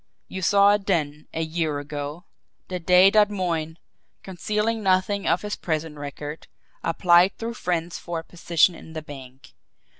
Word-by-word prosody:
You 190 - -6
saw 200 +2 +5
it 205 -1 -2
then, 150 -5 -1
a 165 - -2
year 160 -2 -2
ago, 145 +4 -6 0.4
the 180 -1 -3
day 180 +3 +6
that 210 -1 +5
Moyne, 170 -5 -2 0.5
concealing 210 +4 -2
nothing 195 +1 +1
of - - +1
his 205 0 -3
prison 155 -2 -3
record, 145 +2 -7 0.4
applied 175 +2 +4
through 230 +1 -4
friends 175 -5 -3
for 170 -1 -5
a 165 - -5
position 170 +1 +2
in 160 -1 -12
the 155 -1 -6
bank. 135 -3 -12
170 Hz, 155 wpm, -24 LUFS, 155-195 Hz, 0.5 s, day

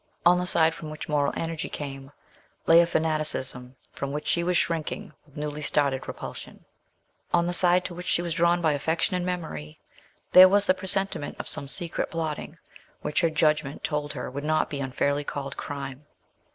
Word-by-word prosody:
On 180 +1 +6
the 180 - -2
side 160 -2 +3
from 155 -1 -8
which 155 0 -7
moral 145 -2 +1
energy 165 -1 -3
came 135 -1 -7 0.5
lay 165 +1 +7
a 170 - +4
fanaticism 155 -6 +3 0.2
from 140 0 -4
which 150 +1 -4
she 170 - +1
was 180 0 +1
shrinking 160 -2 -2
with 145 - -18
newly 150 0 -4
startled 140 -3 +1
repulsion; - - -8 0.7
on 170 0 +3
the 175 - -1
side 180 0 +3
to 180 - -5
which 180 +1 -8
she 175 - +2
was 170 -1 -2
drawn 170 +1 +2
by 160 - +3
affection 160 +5 0
and 180 - -1
memory, 80 - -5 0.5
there 185 +1 +10
was 205 +1 +3
the 185 - +4
presentiment 190 -4 -1
of - - -6
some 140 - 0
secret 170 +4 -1
plotting, 160 -1 -4 0.5
which 150 - 0
her 165 - +3
judgment 150 -2 0
told 150 -1 -2
her 125 - -5
would 140 +2 -5
not 155 +1 0
be 145 - -3
unfairly 140 +2 -1
called 140 -1 -5
crime. 140 -1 -6
155 Hz, 185 wpm, -26 LUFS, 145-170 Hz, 0.7 s, there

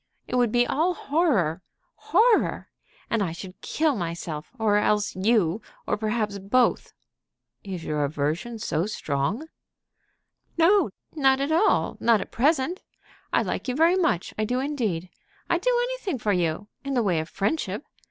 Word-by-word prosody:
It - - -8
would 245 -3 +3
be 245 +1 +3
all 330 +8 +1
horror, 245 - +1 0.3
horror. 440 +5 +2 0.4
I 205 -7 +1
should 185 +2 -10
kill 310 -3 +1
myself, 165 -4 -5
or 215 -2 +3
else 210 0 +1
you, 200 -1 +2 0.2
or - - 0
perhaps 215 -1 -2
both." 240 +6 +1 0.7
"Is 185 -4 -6
your 150 -1 -1
aversion 155 +10 -2
so 180 -4 -1
strong?" 155 - -2 1.1
"No, 375 +5 +4 0.2
not 270 -3 +3
at 280 +3 -1
all; 370 +7 +2
not 230 -2 +4
at - - -6
present. 300 - +1 0.5
I - - +3
like - - -3
you 250 - -1
very 330 +5 +4
much. 325 - 0
I - - +2
do 250 +4 0
indeed. 225 - -2 0.4
I'd - - +2
do - - +2
anything 420 - -3
for 215 -3 0
you 175 +2 -1 0.2
in 275 0 -2
the 240 - +2
way 180 -6 +1
of 160 +1 -4
friendship. 210 +1 -2
220 Hz, 150 wpm, -25 LUFS, 185-290 Hz, 1.1 s, No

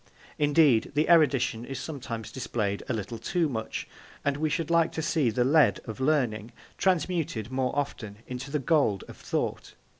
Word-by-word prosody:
Indeed, 145 -5 +4
the 150 +2 +2
erudition 140 -8 +3
is 135 +1 -6
sometimes 120 -7 -6
displayed 110 -5 -2
a - - +1
little 110 +2 -5
too 170 +8 0
much, 110 -6 -4 0.4
and 140 -1 +2
we 155 +2 0
should 165 0 -2
like 170 -1 +3
to 160 - -2
see 155 -6 +2
the 120 +3 +1
lead 145 +1 +4
of 110 +2 -7
learning 125 -6 0 0.2
transmuted 165 - 0
more 130 -1 0
often 110 -7 -3
into 125 +2 -6
the 150 - 0
gold 140 - +2
of - - -10
thought. - - -3
135 Hz, 170 wpm, -28 LUFS, 115-155 Hz, 0.4 s, Indeed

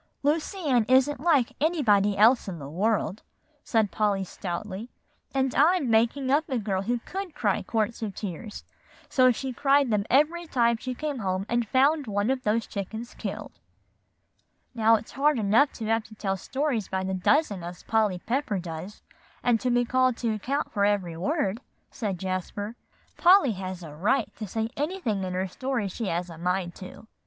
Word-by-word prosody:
"Lucy 310 +7 0
Ann 250 -5 +3
isn't 265 +2 +4
like 290 -6 +2
anybody 210 - +3
else 230 +4 +5
in 185 -3 -5
the 140 -3 -8
world," 205 +5 0 0.4
said 220 -4 +1
Polly 205 -2 +1
stoutly; 190 +4 -5 0.4
"and 265 -1 0
I'm 300 -4 +3
making 240 +4 +2
up 305 +3 +2
a 260 - 0
girl 195 -4 -1
who 240 +5 0
could 380 -4 -5
cry 210 -9 +1
quarts 225 +3 -1
of 210 -3 -4
tears, 210 +2 -6 0.5
so 255 -3 +5
she 260 +2 -4
cried 275 0 +3
them 210 -1 +1
every 320 +6 +2
time 235 -4 +2
she 255 +2 -5
came 295 -1 -3
home 190 -2 -1
and 235 -1 0
found 280 +4 +3
one 205 +3 0
of 265 -1 -1
those 225 0 0
chickens 220 +4 -6
killed." - - -6 1.1
"Now, 225 -1 +4
it's 220 - -5
hard 290 +2 +2
enough 225 +7 +3
to 225 - -6
have 225 +1 +1
to 215 - -14
tell 195 -2 -1
stories 260 +1 -2
by 190 0 -2
the 190 0 -2
dozen 200 - +1
as 175 +1 -8
Polly 215 -4 +1
Pepper 235 +2 -1
does, 175 +2 -7 0.4
and 240 -2 +3
be 245 0 +3
called 255 0 +2
to 230 -2 -1
account 270 +7 -2
for 200 - 0
every 200 -5 +1
word," 220 - -1 0.3
said 205 -5 -3
Jasper. 190 +4 -4 0.4
"Polly 360 -7 +6
has 185 -2 -6
a 150 -2 -9
right 215 - 0
to 215 - -5
say 220 +3 -2
anything 290 - -2
in 185 -1 -3
her 190 +1 -1
stories 240 0 -2
she 230 - -4
has 175 0 -2
a 165 - -10
mind 180 0 -1
to." 185 +3 -10
225 Hz, 180 wpm, -27 LUFS, 195-265 Hz, 1.1 s, Polly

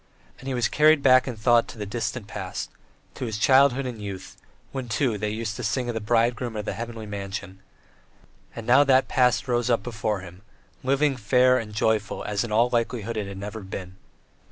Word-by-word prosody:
And 130 - -10
he 135 - -1
was 120 -3 +1
carried 155 -1 +4
back 130 0 +5
in 125 - -3
thought 115 +2 +3
to - - -10
the 105 - -4
distant 110 +1 -3
past, 95 -3 -6 0.4
to - - -5
his 110 -3 -3
childhood 135 +2 +4
and 120 -4 -6
youth, 95 -2 -7 0.4
when, 130 -3 -5
too, 120 -1 +1
they 105 +1 -1
used 110 +1 -3
to - - -5
sing 125 -2 -1
of - - -1
the 110 - -2
Bridegroom 115 +2 +1
and 105 - -2
of - - -12
the - - -2
Heavenly 115 -1 -6
Mansion; 100 -1 -6 1.0
and 115 - -7
now 130 +4 +6
that 135 -1 +4
past 125 +1 +2
rose 120 -1 0
up 120 - +2
before 110 -4 -2
him 90 +1 -12 0.4
living, 140 +2 +2
fair, 125 +3 +4
and 105 -2 -7
joyful 110 0 0
as 100 -1 -1
in 120 - -6
all 115 +3 +3
likelihood 115 -1 -1
it 100 -2 -4
never 105 +3 -6
had 95 -2 -12
been. 95 -1 -7
115 Hz, 205 wpm, -25 LUFS, 105-125 Hz, 1.0 s, now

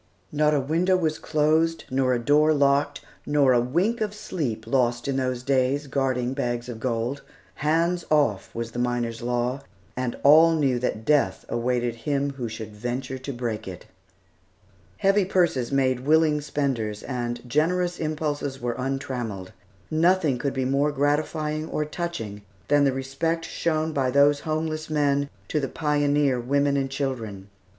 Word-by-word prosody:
Not 150 0 +2
a - - +3
window 170 +7 +2
was 155 -3 -1
closed, 160 +2 +1
nor 130 -1 +2
a - - +1
door 150 +5 +3
locked, 140 0 +2 0.2
nor 145 -3 +3
a 120 - +4
wink 180 - 0
of 210 -1 -1
sleep 140 - -4
lost 120 -1 +1
in 140 - 0
those 130 -2 -1
days, 135 +2 +1
guarding 130 -2 -1
bags 120 -3 -2
of 120 -3 -6
gold. 120 +3 -2 0.4
"Hands 165 +3 +1
off" 145 -10 +2
was 115 0 -4
the 120 - -5
miners' 120 -1 -1
law, 125 +2 -1 0.3
and 125 -1 -3
all 160 +3 +7
knew 135 -5 +1
that 110 -3 -2
death 140 -10 +2
awaited 120 0 0
him 140 +4 -1
who 125 -4 -5
should 110 -1 -8
venture 125 +4 -4
to 135 +2 -5
break 120 -5 -4
it. 90 -2 -8 1.1
Heavy 195 +1 +3
purses 170 -10 +1
made 130 -2 +2
willing 150 +2 +3
spenders, 125 -8 -2
and 120 -1 -4
generous 175 +6 +1
impulses 150 -3 -2
were 120 0 -2
untrammelled. 125 -8 -4 0.4
Nothing 160 -4 +2
could 140 0 -1
be 130 -1 0
more 140 +3 +2
gratifying 150 +2 -1
or 150 - -1
touching 150 -11 -5 0.3
than 145 0 +4
the 135 - +3
respect 135 +6 -2
shown 160 -1 -1
by 135 -3 +1
those 140 +2 +4
homeless 155 0 -3
men 145 -2 +1 0.2
to 150 - +1
the 135 -2 -2
pioneer 145 -3 +1
women 140 +3 +1
and 135 -1 0
children. 115 -8 -4
140 Hz, 155 wpm, -25 LUFS, 125-155 Hz, 1.1 s, all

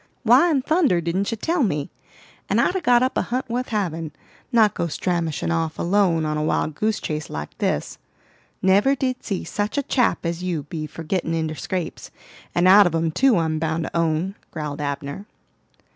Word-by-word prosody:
"Why 350 - +6
in 280 -5 +1
thunder 310 - +3
didn't 170 +4 -1
you 230 - -3
tell 330 +8 0
me? 150 - -1 0.6
and - - +2
I'd 360 - +2
a 380 - 0
got 245 -3 +4
up 260 - 0
a - - +2
hunt 255 +2 -3
wuth 250 +2 -2
havin', 165 -7 -2 0.4
not 220 -4 +4
go 170 - -2
stramashing 170 -1 -2
off 165 -1 -1
alone 175 -3 +2
on 150 0 -1
a 150 - -1
wild 155 0 0
goose 215 +7 -1
chase 150 -1 -4
like 75 0 -6
this. - - -1 0.6
Never 200 +9 +4
did 255 -1 -2
see 195 -4 -3
such 210 +5 -3
a 285 - +1
chap 250 -8 +1
as 170 +1 -2
you 170 -5 -2
be 155 +1 -5
for 165 - -9
gittin' 165 0 -1
inter 160 -1 -1
scrapes, 175 +3 -4 0.5
and 175 +1 +4
out 200 +1 +8
of 165 - -2
'em 165 0 0
too, 260 +6 +3
I'm 160 -2 0
bound 160 +1 -1
to - - -6
own," 165 +3 0 0.2
growled 150 -2 -5
Abner. 140 +6 -4
175 Hz, 195 wpm, -23 LUFS, 160-220 Hz, 0.6 s, out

